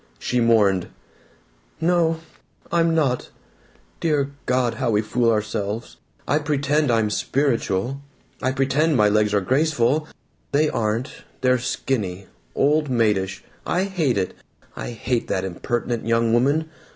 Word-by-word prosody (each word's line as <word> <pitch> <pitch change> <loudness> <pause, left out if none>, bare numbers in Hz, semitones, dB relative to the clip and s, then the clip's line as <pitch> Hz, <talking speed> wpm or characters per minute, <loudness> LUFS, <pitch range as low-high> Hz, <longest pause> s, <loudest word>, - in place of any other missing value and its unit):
She 125 - -1
mourned: 105 -6 +3 0.9
"No. 165 -1 +2 0.5
I'm 165 -1 +2
not. 135 -6 0 0.7
Dear 145 -4 +1 0.2
God, 125 -1 +2
how 125 - +1
we 105 -1 +2
fool 115 +2 +1
ourselves! 105 +1 -2 0.3
I 150 - +2
pretend 145 0 +1
I'm 110 -3 +2
'spiritual.' 125 -1 0 0.4
I 130 - +1
pretend 135 +3 +2
my 105 -1 +5
legs 105 0 +2
are 100 -1 +2
graceful. 145 - +1 0.5
They 150 +2 +3
aren't. 115 +7 -2 0.2
They're 125 -1 +3
skinny. 105 -6 -2 0.3
Old 150 +1 +2
maidish. 105 -6 +1 0.2
I 180 - 0
hate 170 - 0
it! 95 -2 -1 0.4
I - - -5
hate 120 +1 -2
that 95 0 -1
impertinent 115 +5 -3
young 115 0 +2
woman! 140 +7 +2
125 Hz, 125 wpm, -23 LUFS, 110-145 Hz, 0.9 s, my